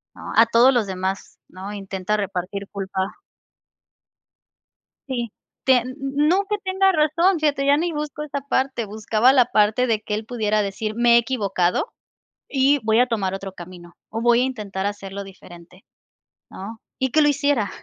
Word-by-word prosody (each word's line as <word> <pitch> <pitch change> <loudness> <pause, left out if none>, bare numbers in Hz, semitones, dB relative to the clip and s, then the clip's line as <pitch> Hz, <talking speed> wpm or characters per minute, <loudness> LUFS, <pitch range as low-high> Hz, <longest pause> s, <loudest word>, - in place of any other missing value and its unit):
¿No? - - -8
A 230 - +7
todos 235 +3 +5
los 235 -4 +2
demás, 190 0 -4
¿no? 190 +3 -8
Intenta, 195 0 -3
repartir 195 0 -4
culpa 195 -1 -4 1.9
Sí, 240 -4 -3 0.3
tien 255 -1 +3
n 280 +2 0
no, 385 +3 +3
que 420 - 0
tenga 380 0 +2
razón, 335 +4 +2
fíjate, 290 -2 +1
ya 280 +1 +5
ni 340 +2 -1
busco 300 0 -4
esa 285 -1 -4
parte, 260 -4 0
buscaba 215 +4 +2
la 255 -3 +5
parte, 215 +2 +2
de 225 -3 0
que 210 - -5
él 215 +1 -3
pudiera 215 -3 0
decir: 215 +2 -3
"Me 235 0 +4
he - - +8
equivocado, 205 - 0 0.6
y 275 +1 +3
voy 220 +2 +3
a 250 - +4
tomar 195 -5 -1
otro 195 -1 -6
camino. 175 -1 -12 0.2
O 225 - -4
voy 240 0 +4
a - - +3
intentar 205 -7 -4
hacerlo 200 -1 -5
diferente, 180 -1 -15 0.7
¿no?". 220 +4 -9 0.2
Y 260 -1 -1
que 310 - +4
lo 295 - +4
hiciera. 285 -7 +1
225 Hz, 170 wpm, -22 LUFS, 195-270 Hz, 1.9 s, he